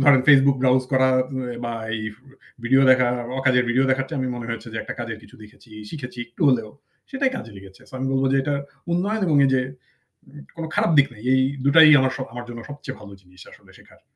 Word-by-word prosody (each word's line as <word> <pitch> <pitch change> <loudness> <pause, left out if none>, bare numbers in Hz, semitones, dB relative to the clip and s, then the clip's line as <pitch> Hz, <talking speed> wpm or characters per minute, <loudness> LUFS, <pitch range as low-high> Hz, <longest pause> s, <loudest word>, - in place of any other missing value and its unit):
ধরেন 135 -1 +6
Facebook 140 -1 +6
browse 130 0 +3
করা 130 0 +3 0.5
বা 120 - -3 0.2
এই 110 - -5 0.6
ভিডিও 135 +3 +4
দেখা। 130 -1 +4 0.3
অকাজের 130 -2 +3
ভিডিও 130 +3 +2
দেখার 130 0 0
চেয়ে 160 - -4
আমি 130 - -2
মনে 120 -1 -7
হচ্ছে 115 - -11
যে 110 - -4
একটা - - -7
কাজের 115 -2 -5
কিছু - - -17
দেখেছি। 105 +2 -18 0.2
শিখেছি 125 -5 -8
একটু 120 - -7
হলেও 115 -5 +1 0.4
সেটাই 270 -1 0
কাজে 115 - -8
লেগেছে। 95 0 -14
সো - - -22
আমি 130 - -3
বলব 135 0 +1
যে - - +3
এটা 145 +1 -1 0.4
উন্নয়ন 200 +6 -1
এবং 155 -4 +2
এই - - +1
যে 130 - +2 1.0
কোন 165 - -5
খারাপ - - +2
দিক 140 -1 +6
নেই। 110 -1 -15
এই 130 - +3 0.2
দুটাই 155 +2 +7
আমার 130 0 +1
স - - -13
আমার 120 0 -7
জন্য 120 -1 -8
সবচেয়ে 145 -2 -8
ভালো 100 -1 -12
জিনিস 90 -1 -20
আসলে - - -18
শেখার। - - -21
130 Hz, 210 wpm, -22 LUFS, 120-140 Hz, 1.0 s, দুটাই